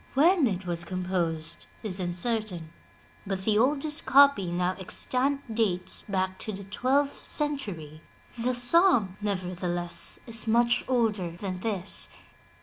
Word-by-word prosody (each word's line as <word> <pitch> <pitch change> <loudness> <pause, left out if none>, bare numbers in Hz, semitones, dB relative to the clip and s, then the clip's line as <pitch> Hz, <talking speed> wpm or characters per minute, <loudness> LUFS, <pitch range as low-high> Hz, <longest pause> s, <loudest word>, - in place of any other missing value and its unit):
When 320 +1 +4
it 190 -3 -3
was 170 -1 -3
composed 170 -3 -3 0.2
is 200 -3 +2
uncertain, 180 -2 -2 0.5
but 190 -1 -3
the 210 +1 +2
oldest 295 +4 0
copy 275 -10 +5
now 180 +1 0
extant 255 +6 -1
dates 195 -5 +1
back 190 -2 -3
to 215 - -4
the 200 0 -8
twelfth 270 +8 0
century. 195 - 0 0.4
The 250 +2 0
song, 245 - +4
nevertheless, 180 -3 -1
is 230 -1 -2
much 235 +2 +3
older 220 -8 0
than 180 +2 -6
this. 200 -2 -1
200 Hz, 125 wpm, -27 LUFS, 180-245 Hz, 0.5 s, copy